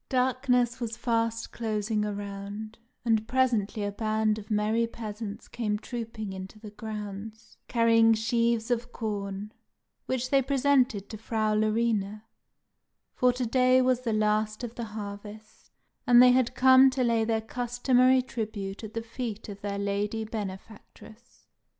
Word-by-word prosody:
Darkness 250 Hz, -1 st, +1 dB
was 230 Hz, -2 st, -4 dB
fast 230 Hz, -1 st, -1 dB
closing 215 Hz, -1 st, -1 dB
around, 205 Hz, +1 st, -6 dB, 0.3 s
and 220 Hz, -1 st, +2 dB
presently 235 Hz, -5 st, +1 dB
a 205 Hz, -, -1 dB
band 215 Hz, 0 st, 0 dB
of 210 Hz, -, -12 dB
merry 215 Hz, +2 st, +1 dB
peasants 215 Hz, -2 st, -7 dB
came 210 Hz, -3 st, -2 dB
trooping 225 Hz, -3 st, -6 dB
into 190 Hz, +2 st, -8 dB
the 215 Hz, -1 st, -10 dB
grounds, 215 Hz, 0 st, -8 dB
carrying 230 Hz, -1 st, +4 dB
sheaves 230 Hz, +1 st, 0 dB
of 240 Hz, 0 st, -1 dB
corn, 205 Hz, -2 st, -4 dB, 0.6 s
which 255 Hz, -1 st, -2 dB
they 275 Hz, -1 st, +5 dB
presented 265 Hz, -5 st, +2 dB
to 215 Hz, -, -8 dB
Frau 220 Hz, -1 st, 0 dB
Larina, 215 Hz, -1 st, 0 dB, 0.9 s
for 250 Hz, 0 st, +3 dB
to 250 Hz, 0 st, -3 dB
day 255 Hz, +2 st, +4 dB
was 255 Hz, -1 st, +3 dB
the 245 Hz, -3 st, -2 dB
last 215 Hz, +1 st, 0 dB
of 235 Hz, -1 st, -5 dB
the 235 Hz, -1 st, -5 dB
Harvest, 210 Hz, 0 st, -9 dB, 0.4 s
and 240 Hz, -1 st, +7 dB
they 250 Hz, 0 st, +8 dB
had 250 Hz, -1 st, +2 dB
come 260 Hz, +1 st, +7 dB
to 260 Hz, -1 st, -1 dB
lay 230 Hz, -2 st, +2 dB
their 225 Hz, 0 st, +1 dB
customary 245 Hz, +2 st, +2 dB
tribute 215 Hz, -5 st, -5 dB
at 220 Hz, 0 st, -8 dB
the 230 Hz, -, -2 dB
feet 230 Hz, -2 st, -6 dB
of 200 Hz, -1 st, -8 dB
their 200 Hz, -1 st, -3 dB
Lady 205 Hz, +2 st, -1 dB
Benefactress. 215 Hz, +2 st, -9 dB
220 Hz, 145 wpm, -28 LUFS, 210-240 Hz, 0.9 s, they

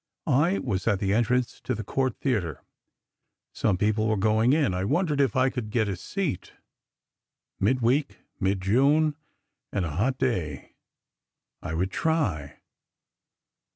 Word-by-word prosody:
I 155 Hz, +6 st, +3 dB
was 100 Hz, -6 st, -2 dB
at 105 Hz, -3 st, +3 dB
the 100 Hz, 0 st, 0 dB
entrance 120 Hz, +2 st, 0 dB
to 130 Hz, -, -1 dB
the 110 Hz, -, -5 dB
Cort 130 Hz, +3 st, -1 dB
Theatre. 95 Hz, -, -2 dB, 0.9 s
Some 100 Hz, -4 st, +1 dB
people 110 Hz, +2 st, +1 dB
were 110 Hz, -1 st, +1 dB
going 110 Hz, +4 st, +3 dB
in. 145 Hz, -, +2 dB
I 90 Hz, +1 st, -1 dB
wondered 150 Hz, -, +1 dB
if 135 Hz, -6 st, +1 dB
I 130 Hz, 0 st, +3 dB
could 120 Hz, -4 st, -4 dB
get 110 Hz, -1 st, +1 dB
a 100 Hz, -, -2 dB
seat. 155 Hz, -, -4 dB, 1.1 s
Midweek, 130 Hz, +6 st, +1 dB, 0.2 s
mid 95 Hz, 0 st, 0 dB
June, 140 Hz, +10 st, +3 dB, 0.6 s
and 95 Hz, -, -1 dB
a 80 Hz, -, -3 dB
hot 120 Hz, -, 0 dB
day—I 85 Hz, -, -6 dB
would 95 Hz, +3 st, -1 dB
try. 100 Hz, -, -1 dB
110 Hz, 135 wpm, -26 LUFS, 95-135 Hz, 1.1 s, I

